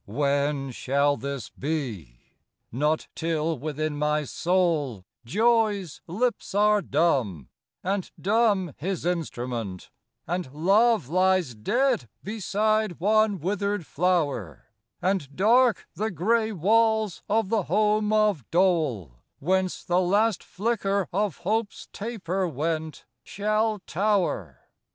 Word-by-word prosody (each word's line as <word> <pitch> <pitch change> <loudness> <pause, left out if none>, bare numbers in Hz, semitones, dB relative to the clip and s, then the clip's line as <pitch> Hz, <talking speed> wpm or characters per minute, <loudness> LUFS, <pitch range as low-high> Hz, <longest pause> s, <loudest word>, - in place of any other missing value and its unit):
II 100 - -11
When 140 -1 0
shall 140 +3 +1
this 140 -4 -5
be? 115 - -4 0.5
Not 150 +6 0
till 160 -2 -1
within 155 +1 -3
my 150 0 +1
soul 155 - 0 0.2
Joy's 210 - +1
lips 220 +3 -2
are 210 0 +4
dumb, 130 - 0 0.3
and 190 0 -1
dumb 200 - +2
his 185 +2 -3
instrument, 120 - -3 0.3
And 175 -4 -3
love 200 - +3
lies 185 -5 +2
dead 210 - 0
beside 215 -1 0
one 215 +2 +3
withered 200 +1 -1
flower, 145 - -1 0.4
And 180 -7 -1
dark 235 +4 +3
the 215 +2 -2
gray 220 +5 +1
walls 220 +2 +2
of 215 -1 +1
the 225 -1 +2
home 210 0 +2
of 215 - +2
dole, 150 - +1 0.2
Whence 185 +4 0
the 175 +1 +1
last 205 +3 +2
flicker 200 -2 -1
of 200 -2 0
hope's 215 +2 -2
taper 195 -4 -2
went, 160 +1 -3 0.2
Shall 215 +2 0
tower. 195 +3 0
180 Hz, 110 wpm, -26 LUFS, 145-210 Hz, 0.5 s, are